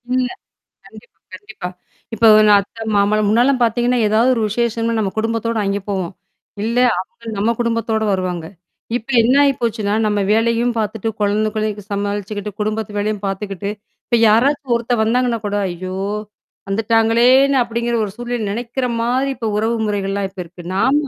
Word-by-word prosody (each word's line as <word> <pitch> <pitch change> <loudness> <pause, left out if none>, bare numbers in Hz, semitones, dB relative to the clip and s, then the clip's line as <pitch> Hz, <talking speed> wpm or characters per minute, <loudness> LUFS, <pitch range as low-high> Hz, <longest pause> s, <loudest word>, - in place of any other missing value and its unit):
இல்ல. 255 -1 +1 0.6
கண்டிப்பா, 210 +2 -16 0.2
கண்டிப்பா. 205 -2 -8 0.5
இப்ப 225 - -5
ஒரு 215 - +6
நான் 205 -1 +6
அத்த 225 +3 -9
மாமலாம் 205 +1 +2
முன்னாலாம் 245 +3 +3
பார்த்தீங்கன்னா, 240 +2 +1
ஏதாவது 225 +4 +3
ஒரு 225 - -1
விசேஷம்ன்னா 230 +1 -1
நம்ம 195 -3 -1
குடும்பத்தோட 230 +1 -1
அங்கே 200 +1 -1
போவோம். 190 -2 -2 0.5
இல்ல 230 +2 -1 0.2
அவுங்க 230 +5 -10
நம்ம 205 +3 +1
குடும்பத்தோட 230 -2 0
வருவாங்க. 180 -3 -2 0.5
இப்ப 245 +2 -15
என்ன 250 +4 +3
ஆயிப்போச்சுன்னா, 230 -6 0
நம்ம 210 -1 +1
வேலையும் 230 +2 +2
பார்த்துட்டு 220 +1 -2
குழந்தைங்களையும் 210 0 -1
சமாளிச்சுக்கிட்டு, 205 +1 -3
குடும்பத்து 215 -1 -2
வேலையும் 210 0 -2
பார்த்துக்கிட்டு, 195 0 -4 0.4
இப்ப 235 - +2
யாராச்சும் 265 +4 +2
ஒருத்த 240 +1 -2
வந்தாங்கன்னா 235 +1 +1
கூட 205 0 -2
ஐயோ! 185 +2 -5 0.7
வந்துட்டாங்களேன்னு 230 +6 +4
அப்பிடிங்கிற 235 0 -1
ஒரு 200 - -7
சூழ்நிலை 240 0 -4
நெனைக்கிறமாரி 240 +3 -1
இப்ப 235 -3 -6
உறவு 225 +2 0
முறைகள்லாம் 200 -1 -1
இப்ப 190 0 -14
இருக்கு. 175 0 -13
நாம 260 +8 +2
220 Hz, 140 wpm, -18 LUFS, 205-235 Hz, 0.7 s, ஒரு